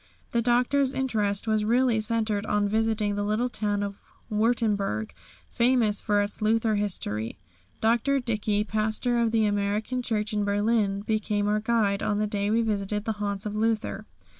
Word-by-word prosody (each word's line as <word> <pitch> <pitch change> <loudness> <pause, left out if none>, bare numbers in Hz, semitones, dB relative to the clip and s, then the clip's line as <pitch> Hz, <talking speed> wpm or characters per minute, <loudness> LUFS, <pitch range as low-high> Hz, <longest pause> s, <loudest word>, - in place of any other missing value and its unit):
The 235 - +1
Doctor's 250 +3 +2
interest 215 -6 0
was 215 -1 +2
really 235 0 +2
centred 215 -2 0
in 205 -1 +2
visiting 220 -1 0
the 205 0 -2
little 215 +4 0
town 205 -3 -1
of 200 0 -5 0.3
Württemberg, 210 - 0 0.4
famous 235 -4 +2
for 205 -2 +2
its 205 +1 -6
Luther 225 +1 +2
history. 115 - -2 0.4
Dr. 235 +5 +2
Dickey, 210 -4 0
Pastor 220 +3 0
of 230 -1 +2
the 220 -1 +2
American 205 +4 -1
Church 215 -2 -1
in 210 -1 0
Berlin, 205 0 +1
became 210 -1 -1
our 210 +1 +2
guide 210 -3 +1
on 205 - 0
the 210 - +1
day 205 -1 -1
we 230 +2 +2
visited 210 -1 -2
the 225 - 0
haunts 200 -1 -2
of 210 0 -3
Luther. 220 0 -1
215 Hz, 165 wpm, -26 LUFS, 205-230 Hz, 0.4 s, Doctor's